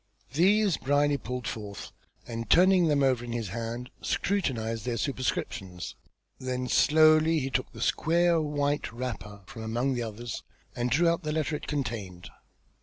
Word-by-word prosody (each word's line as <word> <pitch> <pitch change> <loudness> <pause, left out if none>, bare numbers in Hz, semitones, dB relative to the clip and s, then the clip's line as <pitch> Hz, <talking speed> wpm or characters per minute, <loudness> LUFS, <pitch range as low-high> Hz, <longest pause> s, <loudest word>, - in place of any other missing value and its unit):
These 195 +3 +4
Brierly 145 +1 +2
pulled 125 0 -5
forth, 105 -2 -6 0.3
and 115 -2 -5
turning 180 - +6
them 145 -2 +3
over 130 -3 +2
in 120 -1 -5
his 115 -4 -3
hand, 115 +4 -5
scrutinised 115 - -1
their 120 0 -2
superscriptions. 100 - -3 0.5
Then 130 0 -3
slowly 155 +3 +5
he 135 -2 -2
took 130 - -1
the - - -10
square 170 0 +2
white 145 -1 -1
wrapper 115 -4 -6
from 110 - -9
among 120 +5 0
the 120 - -2
others, 115 +1 -5 0.3
and 120 0 -1
drew 165 +7 +3
out 170 +1 +2
the 150 -2 -3
letter 155 0 -1
it - - -7
contained. 110 -11 -4
130 Hz, 155 wpm, -28 LUFS, 115-155 Hz, 0.5 s, turning